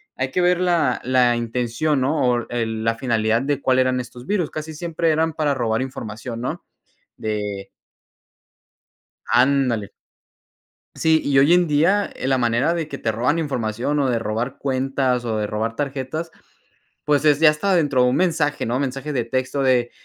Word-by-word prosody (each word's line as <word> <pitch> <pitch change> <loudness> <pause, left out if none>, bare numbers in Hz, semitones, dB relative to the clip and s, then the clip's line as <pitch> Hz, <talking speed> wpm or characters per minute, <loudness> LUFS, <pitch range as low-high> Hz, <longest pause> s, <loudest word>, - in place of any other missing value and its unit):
hay 130 0 -2
que 180 - 0
ver 180 0 +3
la 170 -8 +1
la 125 -2 +3
intención, 125 +5 -1
¿no?, 135 -1 +1
o 120 -1 -2
el 110 -2 -2
la 115 0 +1
finalidad 115 -2 0
de 145 0 -1
cuál 130 -1 +2
eran 130 0 +2
estos 120 0 -9
virus. 180 -3 -1
Casi 155 +1 -6
siempre 165 +1 -1
eran 160 +1 +1
para 150 -2 0
robar 115 -2 -1
información, 115 -2 -6
¿no? 125 - -4 0.5
De 105 -2 -4 1.6
Ándale. 125 -4 +2 1.0
Sí, 160 0 +2
y 140 -1 +2
hoy 145 +5 +6
en 180 -2 +3
día, 170 +8 +2
la 130 0 +2
manera 120 +7 +1
de 165 -3 -3
que 140 - -6
te 110 - -1
roban 125 +8 0
información, 125 -2 -2
o 135 - +1
de 120 -2 +1
robar 115 +5 -3
cuentas, 130 -2 0
o 115 -2 -2
de 105 -1 -1
robar 110 +2 -3
tarjetas, 145 +3 -4 0.7
pues, 150 0 +2
es 150 -2 +4
ya 160 -1 +7
hasta 185 +6 0
dentro 145 -6 +2
de 125 - +4
un - - 0
mensaje, 160 -5 0
¿no?, 120 +3 -1
mensaje 135 +2 -3
de 120 -4 -1
texto 130 +3 -2
de, 125 -2 +2
130 Hz, 175 wpm, -21 LUFS, 120-150 Hz, 1.6 s, ya